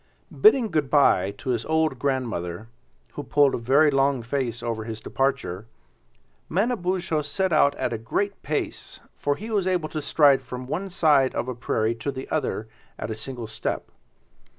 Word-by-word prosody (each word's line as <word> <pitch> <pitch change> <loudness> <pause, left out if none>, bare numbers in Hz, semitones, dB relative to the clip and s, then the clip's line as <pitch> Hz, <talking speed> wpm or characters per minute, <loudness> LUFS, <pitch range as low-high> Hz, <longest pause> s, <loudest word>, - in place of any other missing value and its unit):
Bidding 265 - +4
good 150 -4 0
by 130 -10 +4
to 130 - -3
his 115 -2 -1
old 160 -4 +1
grandmother, 115 -8 -2 0.4
who - - -6
pulled 145 0 +3
a - - -1
very 140 +6 +4
long 135 -2 +2
face 120 -2 -2
over 115 -2 -2
his 110 0 -6
departure, 130 -6 -2 0.8
Manabozho 185 -5 0
set 180 +5 -1
out 140 -2 +4
at 120 - -2
a 115 - -3
great 200 - -2
pace, 150 0 -4 0.2
for 145 0 0
he 220 +8 -7
was 200 -4 +1
able 175 -4 0
to 155 - -4
stride 140 -1 +4
from 125 0 -7
one 180 +9 -3
side 150 -7 +3
of - - -2
a 130 - -2
prairie 115 -1 0
to 115 +4 -4
the 130 0 -7
other 130 -8 -1 0.3
at - - -5
a - - -3
single 120 +1 -6
step. 110 - -4
140 Hz, 175 wpm, -25 LUFS, 120-155 Hz, 0.8 s, Bidding